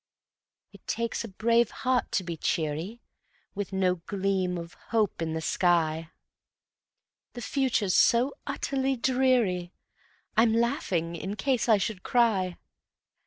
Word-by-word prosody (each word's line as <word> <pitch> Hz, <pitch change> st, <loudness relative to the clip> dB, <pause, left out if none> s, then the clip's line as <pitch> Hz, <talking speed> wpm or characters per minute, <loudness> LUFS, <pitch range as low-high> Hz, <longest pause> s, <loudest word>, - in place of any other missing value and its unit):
It -, -, -17 dB
takes 230 Hz, 0 st, -2 dB
a -, -, -5 dB
brave 230 Hz, +3 st, +2 dB
heart 255 Hz, -1 st, -1 dB
to 190 Hz, -, +1 dB
be 170 Hz, -2 st, -4 dB
cheery 160 Hz, +8 st, -2 dB, 0.5 s
With 205 Hz, -1 st, -4 dB
no 185 Hz, -1 st, +1 dB
gleam 190 Hz, -2 st, 0 dB
of 170 Hz, 0 st, -7 dB, 0.2 s
hope 215 Hz, -6 st, +1 dB
in 160 Hz, -1 st, -2 dB
the 160 Hz, -, -2 dB
sky; 165 Hz, -2 st, +1 dB, 1.2 s
The 240 Hz, -, -7 dB
future's 235 Hz, -9 st, +1 dB
so 245 Hz, +7 st, +4 dB
utterly 270 Hz, -1 st, -1 dB
dreary, 240 Hz, -9 st, +1 dB, 0.6 s
I'm 225 Hz, 0 st, +4 dB
laughing 225 Hz, -, 0 dB
in 190 Hz, +5 st, -4 dB
case 250 Hz, 0 st, 0 dB
I 220 Hz, -, +7 dB
should 200 Hz, -1 st, -3 dB
cry. 200 Hz, -8 st, +1 dB
205 Hz, 125 wpm, -28 LUFS, 180-235 Hz, 1.2 s, I